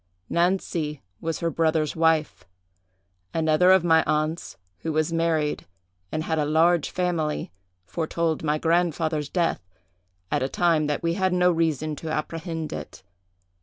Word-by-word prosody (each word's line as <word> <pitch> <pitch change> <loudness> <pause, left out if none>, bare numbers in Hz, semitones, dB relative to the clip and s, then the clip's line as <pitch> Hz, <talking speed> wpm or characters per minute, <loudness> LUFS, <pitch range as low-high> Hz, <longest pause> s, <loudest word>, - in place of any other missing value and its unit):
Nancy 170 - 0 0.2
was 165 0 -3
her 165 -1 0
brother's 160 -2 +1
wife. 160 - +1 0.9
Another 160 +2 +3
of 190 -2 +6
my 160 -2 +4
aunts, 155 +2 -1 0.2
who 160 - -3
was 155 +1 0
married 165 -2 0 0.4
and 155 - -2
had 160 -1 -1
a - - +2
large 160 +1 +3
family, 170 - -1 0.3
foretold 165 - -1
my 150 -1 +1
grandfather's 160 -2 0
death, 175 -2 0 0.7
at - - +1
a 130 - 0
time 165 -3 +2
that 150 +2 -2
we 165 0 +1
had 185 0 +1
no 180 0 +4
reason 155 -2 0
to 160 - -6
apprehend 160 +1 -4
it. - - -8
160 Hz, 140 wpm, -25 LUFS, 155-170 Hz, 0.9 s, of